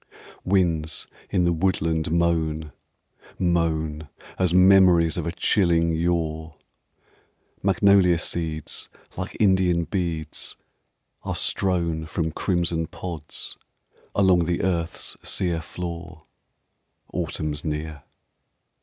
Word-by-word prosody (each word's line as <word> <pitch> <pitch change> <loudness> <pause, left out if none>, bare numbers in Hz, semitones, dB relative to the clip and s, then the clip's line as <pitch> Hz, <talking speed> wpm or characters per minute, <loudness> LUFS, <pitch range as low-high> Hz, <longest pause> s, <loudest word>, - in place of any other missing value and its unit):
Winds 85 -5 +1 0.2
in 90 -3 +2
the 85 - +3
woodland 80 -2 0
moan 80 -2 0 0.7
Moan 80 -4 0 0.3
As 90 -2 +2
memories 90 -3 +6
Of 85 -2 -3
a - - -1
chilling 85 -3 +2
yore. 80 -2 -1 1.0
Magnolia 95 -2 +4
seeds 80 -2 -3 0.3
like - - -5
Indian 95 -4 +3
beads 80 -2 -3 0.7
are - - -3
strown 85 -4 0
From 80 0 -2
crimson 85 -2 0
pods 85 -4 -6 0.6
along 95 -4 +4
the 85 0 -1
earth's 85 -3 -2
sere 85 -4 -1
floor 85 -1 -7 0.9
Autumn's 75 -1 -3
near. 75 -1 -4
85 Hz, 90 wpm, -24 LUFS, 80-90 Hz, 1.0 s, memories